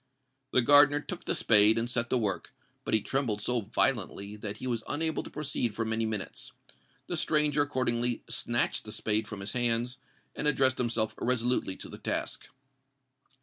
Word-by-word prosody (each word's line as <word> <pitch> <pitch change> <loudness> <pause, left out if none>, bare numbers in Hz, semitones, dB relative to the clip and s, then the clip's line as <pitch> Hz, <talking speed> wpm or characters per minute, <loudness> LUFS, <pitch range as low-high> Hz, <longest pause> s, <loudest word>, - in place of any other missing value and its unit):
The 130 - +2
gardener 145 +2 +6
took 175 +4 -8
the - - -1
spade, 110 0 +6
and 115 +1 0
set 120 -1 -2
to 130 - +2
work; 110 +3 -3 0.3
but - - +2
he 110 - +2
trembled 125 -5 -1
so 120 +3 -1
violently 105 -2 -1
that 105 -1 -6
he - - -8
was 120 -3 -2
unable 160 +2 -1
to - - -10
proceed 135 -7 -3
for 115 - -2
many 110 0 -1
minutes. 110 -3 -5 0.5
The 175 - -3
stranger 150 -2 +1
accordingly 125 -4 -1
snatched 120 -1 -1
the 105 - -8
spade 110 0 0
from 105 -2 -7
his 100 - -5
hands, 120 0 +1 0.4
and 150 - -1
addressed 130 -3 +3
himself 115 -3 0
resolutely 120 -5 0
to - - -9
the - - -11
task. - - -4
120 Hz, 175 wpm, -29 LUFS, 110-135 Hz, 0.5 s, gardener